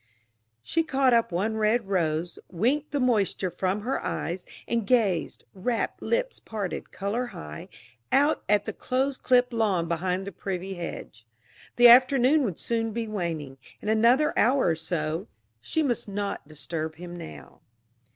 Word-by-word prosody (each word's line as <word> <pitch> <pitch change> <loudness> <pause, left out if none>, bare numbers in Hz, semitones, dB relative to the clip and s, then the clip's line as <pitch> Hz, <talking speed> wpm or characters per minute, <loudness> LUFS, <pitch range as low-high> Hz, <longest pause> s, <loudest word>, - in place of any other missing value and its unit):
She 330 - +1
caught 270 -5 +2
up 230 -4 +3
one 210 +6 -1
red 215 0 +1
rose, 170 -3 -1
winked 255 - 0
the 290 - -1
moisture 210 -7 +1
from 190 +4 -1
her 255 +5 -2
eyes, 175 +2 -3 0.2
and 230 -4 -1
gazed 215 -9 +1
rapt, 225 +5 -2
lips - - -1
parted, 205 -5 -5
color 215 +6 -2
high 75 - -9 0.4
out 290 +3 +3
at 205 0 +3
the - - -4
close 265 +2 -1
clipped 250 -1 +2
lawn 200 -7 +1
behind 180 +3 -1
the 200 - -5
privet 190 0 -5
hedge. 115 -9 -7 0.5
The 240 0 +8
afternoon 255 +4 +6
would 190 -7 -3
soon 225 -1 -2
be 230 0 -3
waning 165 -10 -4 0.2
in 210 - -4
another 240 +8 +4
hour 255 -3 +3
or 165 - +2
so. 160 +2 -3 0.3
She 315 - -1
must 245 -7 -1
not 200 -5 -4
disturb 155 +1 -5
him 175 +1 -8
now. 75 - -10
205 Hz, 150 wpm, -26 LUFS, 175-245 Hz, 0.5 s, The